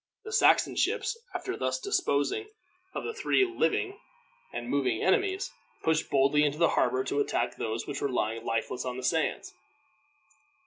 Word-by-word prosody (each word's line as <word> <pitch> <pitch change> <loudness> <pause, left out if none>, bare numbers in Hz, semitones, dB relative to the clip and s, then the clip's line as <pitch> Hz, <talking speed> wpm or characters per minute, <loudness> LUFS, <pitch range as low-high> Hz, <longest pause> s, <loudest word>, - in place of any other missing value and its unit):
The 440 - -8
Saxon - - +4
ships, - - +1 0.2
after - - -3
thus - - -1
disposing 400 - 0 0.5
of - - -3
the 450 - -3
three 410 -3 +2
living 390 +2 0 0.5
and 120 0 -5
moving 125 -4 0
enemies, 380 - +1 0.3
pushed 160 0 +1
boldly 140 +2 +4
into 145 0 +1
the 170 0 +4
harbor 130 +1 +2
to 140 +2 -1
attack 120 -3 0
those 110 +1 -3
which 145 - -5
were 140 - 0
lying 115 -2 -1
lifeless 115 +2 -2
on 125 -1 -4
the 130 - -6
sands. 125 - 0
145 Hz, 160 wpm, -29 LUFS, -, 0.5 s, Saxon